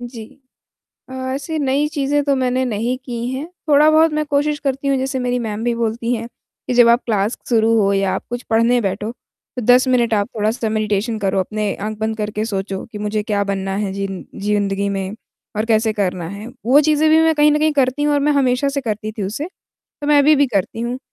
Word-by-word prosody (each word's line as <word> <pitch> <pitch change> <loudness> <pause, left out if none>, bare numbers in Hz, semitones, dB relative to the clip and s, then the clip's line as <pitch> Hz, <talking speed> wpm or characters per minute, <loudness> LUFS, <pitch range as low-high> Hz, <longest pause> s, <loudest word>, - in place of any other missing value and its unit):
जी। 240 -2 -8 0.8
अ, - - -11 0.2
ऐसी 310 +3 -4
नई 280 +1 +1
चीज़ें 290 0 0
तो 280 - +2
मैंने 255 0 0
नहीं 240 +2 -1
की 240 -1 -4
हैं, 275 +4 -4 0.2
थोड़ा-बहुत 310 +2 +5
मैं 305 0 0
कोशिश 295 +1 0
करती 275 0 -2
हूँ, 275 - +2
जैसे 265 0 -2
मेरी 250 0 -1
मैम 220 -1 -4
भी 240 -1 +1
बोलती 230 +1 -1
हैं 230 0 -4 0.4
कि, 250 - -1
"जब 240 -1 +6
आप 235 +2 +4
क्लास 210 0 0
शुरू 225 -1 +3
हो, 200 0 +2
या 195 -1 +1
आप - - -4
कुछ 245 +1 -4
पढ़ने 230 +2 +3
बैठो, 205 +1 -2
तो 250 0 -12
10 250 +1 +6
मिनट 240 -3 +2
आप 205 +1 0
थोड़ा-सा 220 +2 0
मेडिटेशन 215 +1 -1
करो। 195 -2 0
अपने 210 +2 -2
आँख 215 +2 -5
बंद 220 0 -2
करके 210 0 -3
सोचो 195 -3 -4
कि 210 - -6
मुझे 210 0 -2
क्या 205 -1 -1
बनना 195 -1 -2
है, 200 -2 -2
ज़िन् 195 -1 -4 0.2
जिंदगी 200 -1 0
में, 195 0 -3 0.4
और 215 - 0
कैसे 220 -1 +2
करना 180 -5 -2
है।" 200 +4 -8 0.2
वो 275 +4 +6
चीज़ें 310 +1 +3
भी 320 +1 +6
मैं 320 0 +3
कहीं 300 0 +4
न 300 - +2
कहीं 310 0 +2
करती 275 0 +1
हूँ 295 - +2
और 285 - +2
मैं 295 +1 +2
हमेशा 270 -1 +2
से 275 0 -2
करती 215 -2 -4
थी 215 -1 -5
उसे, 210 +10 -3 0.6
तो 290 - -4
मैं 295 -1 +5
अभी 300 +2 +6
भी 285 0 +4
करती 220 -1 -2
हूँ। 240 +2 -3
235 Hz, 220 wpm, -19 LUFS, 210-275 Hz, 0.8 s, जब